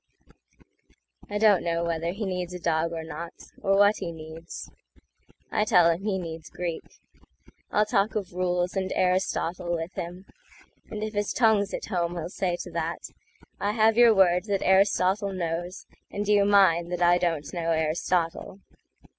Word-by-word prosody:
I 205 - -2
don't 205 -3 +4
know 170 0 -1
whether 170 0 -1
he 205 +3 -4
needs 180 -1 -3
a - - -6
dog 165 -1 0
or 165 -1 -5
not—Or 170 +5 -4
what 205 +1 +5
he 175 -3 -4
needs. 160 +1 -9 0.8
I 210 - +2
tell 180 -6 +5
him 165 +2 -3
he 200 -2 -1
needs 165 -3 -7
Greek; 170 -2 -4 0.9
I'll 210 - +2
talk 210 -1 0
of 195 -5 -3
rules 180 0 -1
and 190 -1 -2
Aristotle 180 -1 0
with 165 +3 -5
him, 180 +3 -7 0.6
And 215 0 -5
if 215 0 -4
his 205 0 -1
tongue's 215 -4 +3
at - - -4
home 175 -3 -2
he'll 170 0 -4
say 180 -1 -1
to 175 - -9
that,"I 170 +4 -6
have 220 0 +3
your 235 -2 +6
word 180 -1 +4
that 200 -2 -1
Aristotle 195 +1 +2
knows, 175 +1 -4 0.2
And 205 0 -4
you 205 -1 +4
mine 185 -4 +4
that 180 0 -1
I 175 +1 +5
don't 165 -4 -2
know 170 -2 -2
Aristotle." 165 +3 -1
180 Hz, 160 wpm, -26 LUFS, 170-200 Hz, 0.9 s, your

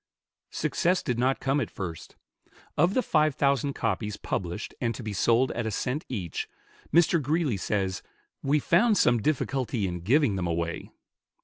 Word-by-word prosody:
Success 180 +1 0
did 120 -1 -1
not 130 +2 +2
come 135 +2 +1
at - - -3
first. 85 -5 -7 0.6
Of 180 +3 +3
the 255 - +2
five 155 -6 +2
thousand 140 0 +1
copies 105 -3 -2
published 90 +3 -4
and 115 -2 0
to 125 - -7
be 105 -1 -4
sold 120 +6 +3
at 115 -1 -3
a - - 0
cent 125 +7 -2
each, 95 -10 -4 0.4
Mr. 170 -1 +4
Greeley 145 - 0
says, 95 -1 -1 0.4
"We 145 +2 +2
found 205 - +3
some 120 -8 +3
difficulty 130 -5 0
in 90 -1 -3
giving 110 - +2
them 90 -2 -1
away." 85 0 -3
125 Hz, 165 wpm, -27 LUFS, 100-150 Hz, 0.6 s, Mr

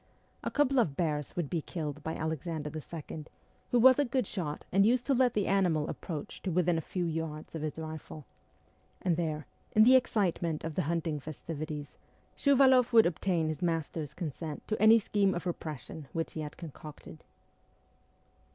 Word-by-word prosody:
A - - -1
couple 275 -2 +2
of 155 - +1
bears 150 -4 -1
would 175 -4 -1
be 165 +2 -1
killed 150 -2 -5
by 160 - -3
Alexander 160 -1 -3
II., 155 0 -7 0.4
who 245 - +3
was 260 +3 +7
a - - +5
good 255 -2 0
shot 155 -6 -4
and 195 +1 +5
used 245 +4 +3
to 275 - +2
let 250 -2 +3
the 205 -2 +2
animal 180 -6 +2
approach 155 -5 -6
to 190 - -3
within 175 0 +2
a 165 - 0
few 175 +3 -3
yards 160 -2 -4
of 160 - -4
his 155 0 -3
rifle; 155 -2 -7 0.8
and 175 -3 +2
there, 155 -3 -2 0.3
in 215 - +8
the 255 +3 +7
excitement 180 -10 +1
of 160 - -3
the - - 0
hunting 165 -3 -1
festivities, 155 0 -6 0.4
Shuvaloff 260 -3 +5
would 225 -1 +8
obtain 170 -1 0
his 155 +2 -3
master's 160 -3 -2
consent 160 -2 -5
to 215 - -2
any 220 +1 +8
scheme 200 -2 +1
of 175 - -4
repression 155 -3 -5
which 165 0 -2
he 160 - -4
had 150 -1 -7
concocted. 155 -2 -10
165 Hz, 175 wpm, -31 LUFS, 155-200 Hz, 0.8 s, in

